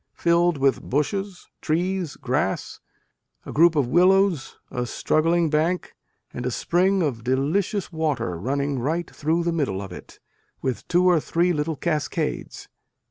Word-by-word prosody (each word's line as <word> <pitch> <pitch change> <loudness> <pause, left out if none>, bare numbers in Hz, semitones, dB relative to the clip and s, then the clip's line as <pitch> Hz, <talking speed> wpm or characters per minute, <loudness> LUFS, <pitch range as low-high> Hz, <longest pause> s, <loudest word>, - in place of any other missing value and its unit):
filled 170 -1 +2
with 135 -1 +2
bushes, 195 +7 -2
trees, 175 +1 -1
grass, - - -2 0.7
a - - -7
group 165 +2 +5
of 145 -3 +3
willows, 180 +2 +3
a 125 -2 -2
straggling 165 +7 +1
bank 160 +4 0 0.4
and 125 - -5
a 125 - 0
spring 185 +8 +1
of 120 -7 -2
delicious 160 - 0
water 150 - -1
running 140 +5 -1
right 160 +7 -2
through 160 +3 0
the 170 0 0
middle 135 - -1
of 95 -2 -7
it, 90 - -11 0.4
with 130 -2 -3
two 180 +1 +3
or 175 -3 +5
three 175 +4 +1
little 150 +1 -1
cascades. 155 -1 -3
160 Hz, 140 wpm, -24 LUFS, 140-175 Hz, 0.7 s, group